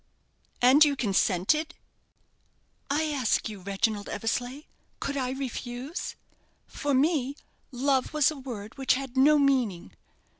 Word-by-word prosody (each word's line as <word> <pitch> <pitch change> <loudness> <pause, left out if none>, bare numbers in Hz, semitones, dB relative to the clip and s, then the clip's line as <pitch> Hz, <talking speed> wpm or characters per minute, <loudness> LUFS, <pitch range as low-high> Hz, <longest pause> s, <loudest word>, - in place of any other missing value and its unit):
'" - - -39
"And 265 +5 +8
you 290 -2 +3
consented?" 220 - +1 1.1
"I 295 +3 +1
ask 260 -6 0
you, 210 -2 -8
Reginald 200 +2 -2
Eversleigh, 245 +6 -3 0.4
could 280 - -3
I 260 -2 -1
refuse? 260 +2 -5 0.5
For 285 -2 -2
me, 280 -1 +1 0.4
love 265 +1 0
was 305 -1 +3
a - - -7
word 245 -3 -8
which 265 -1 +3
had 265 -1 -6
no 290 +3 +5
meaning. 255 - +1
265 Hz, 125 wpm, -27 LUFS, 225-285 Hz, 1.1 s, And